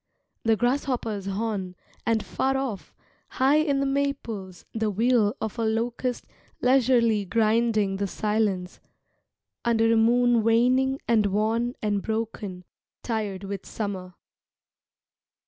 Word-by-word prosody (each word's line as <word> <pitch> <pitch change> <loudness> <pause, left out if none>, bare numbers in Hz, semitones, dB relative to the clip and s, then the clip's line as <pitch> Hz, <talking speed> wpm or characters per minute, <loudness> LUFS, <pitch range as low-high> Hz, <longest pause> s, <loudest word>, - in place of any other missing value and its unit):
The 225 -1 +3
grasshopper's 240 -4 -1
horn, 195 -2 -3 0.3
and 225 -2 +1
far 270 0 0
off, 255 -7 -4 0.4
high 270 +3 +3
in 295 -3 +2
the 275 - +1
maples 270 -10 -3
The 220 -1 0
wheel 225 +1 +2
of 220 +1 -4
a - - +1
locust 235 +3 -1 0.3
leisurely 245 -4 +3
grinding 215 -1 +1
the 200 0 -1
silence, 205 -3 -1 0.8
Under 225 -1 +3
a - - +3
moon 240 +1 +4
waning 255 +4 +3
and 220 -3 +3
worn 225 +4 0
and 205 -2 0
broken, 220 -4 -4 0.4
Tired 210 -5 -3
with 195 -1 -6
summer. 190 -4 -5
225 Hz, 115 wpm, -26 LUFS, 205-245 Hz, 0.8 s, moon